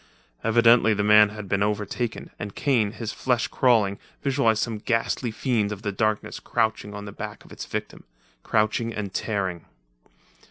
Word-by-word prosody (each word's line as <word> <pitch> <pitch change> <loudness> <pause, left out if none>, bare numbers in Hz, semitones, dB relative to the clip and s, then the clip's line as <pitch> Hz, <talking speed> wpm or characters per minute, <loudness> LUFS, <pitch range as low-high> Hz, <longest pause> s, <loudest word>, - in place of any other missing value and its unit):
Evidently 115 -1 +5
the 105 - 0
man 105 0 +7
had 105 -1 -8
been 100 +1 0
overtaken, 105 +3 -2
and 105 -2 -6
Kane, 115 -7 +1
his 110 0 -5
flesh 125 -2 0
crawling, 110 -6 +2 0.2
visualized 125 -6 +2
some 115 -3 -3
ghastly 115 +2 -1
fiend 110 -2 0
of 105 0 -6
the 105 - -1
darkness 110 +1 -1
crouching 110 -3 -1
on 105 0 -7
the 100 - -7
back 105 +1 -8
of - - -17
its - - -8
victim - - -5 0.4
crouching 110 +1 0
and 100 -3 -4
tearing. 95 -6 -2
110 Hz, 160 wpm, -25 LUFS, 105-115 Hz, 0.4 s, man